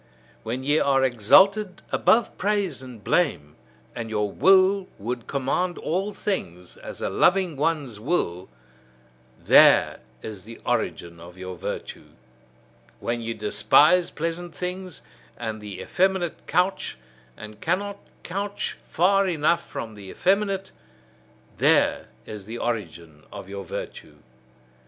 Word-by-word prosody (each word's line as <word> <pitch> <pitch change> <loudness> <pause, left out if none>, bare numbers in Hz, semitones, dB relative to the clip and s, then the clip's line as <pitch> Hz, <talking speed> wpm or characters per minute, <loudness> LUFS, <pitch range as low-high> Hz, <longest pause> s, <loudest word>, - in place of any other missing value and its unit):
When 120 +4 -4
ye 145 +3 +3
are 135 -1 +3
exalted 190 - +4
above 230 0 +3
praise 200 -7 -1
and 125 -5 -11
blame, 100 - 0 0.4
and 115 -1 -5
your 105 -2 -1
will 190 - +4
would 120 +3 -5
command 140 +7 -1
all 190 +6 -2
things, 90 - -4
as - - -9
a - - 0
loving 180 -3 +3
one's 145 -6 -1
will: 100 - -1 0.9
there - - +5 0.2
is 105 -4 -7
the 115 +3 -11
origin 85 -1 -2
of 85 +2 -12
your 95 0 -7
virtue. - - -7 0.9
When 120 0 -2
ye 115 0 -4
despise 150 +11 +4
pleasant 165 +1 -4
things, 180 0 -5 0.3
and 110 -2 -5
the 100 -3 -8
effeminate 185 - -1
couch, 180 - 0 0.4
and 105 0 -11
cannot 200 +4 -1 0.2
couch 200 +3 -4
far 195 +3 +3
enough 170 0 +1
from 110 -1 -6
the 100 -2 -11
effeminate: 195 - 0 0.9
there - - +3 0.2
is 105 -3 -8
the 115 +3 -6
origin 85 -10 -4
of - - -9
your 100 0 -6
virtue. - - -7
145 Hz, 125 wpm, -24 LUFS, -, 0.9 s, there